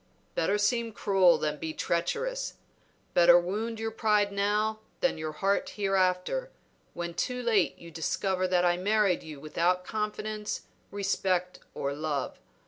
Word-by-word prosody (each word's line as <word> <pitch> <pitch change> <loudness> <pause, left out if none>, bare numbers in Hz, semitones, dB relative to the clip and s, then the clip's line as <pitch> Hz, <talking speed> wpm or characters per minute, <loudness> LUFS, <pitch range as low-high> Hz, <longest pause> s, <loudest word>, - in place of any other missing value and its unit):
"Better 195 +5 +1
seem 230 +2 +1
cruel 190 -4 +4
than 150 -1 -2
be 160 +1 -4
treacherous; - - -1 0.6
better 175 0 +7
wound 215 +6 -3
your 225 0 -2
pride 210 -2 +2
now 210 +2 0 0.2
than 265 -11 +1
your 155 0 -4
heart 200 - 0
hereafter, 195 - +1 0.5
when 170 0 -4
too 250 +8 -2
late 220 -6 +2
you 170 0 -12
discover 185 +3 -1
that 180 -1 +2
I 175 0 +3
married 200 -1 +2
you 155 -3 -9
without 175 +5 0
confidence, 215 0 -3 0.3
respect, 190 -2 -1 0.2
or 140 0 -2
love. 145 -2 -3
195 Hz, 135 wpm, -29 LUFS, 175-215 Hz, 0.6 s, better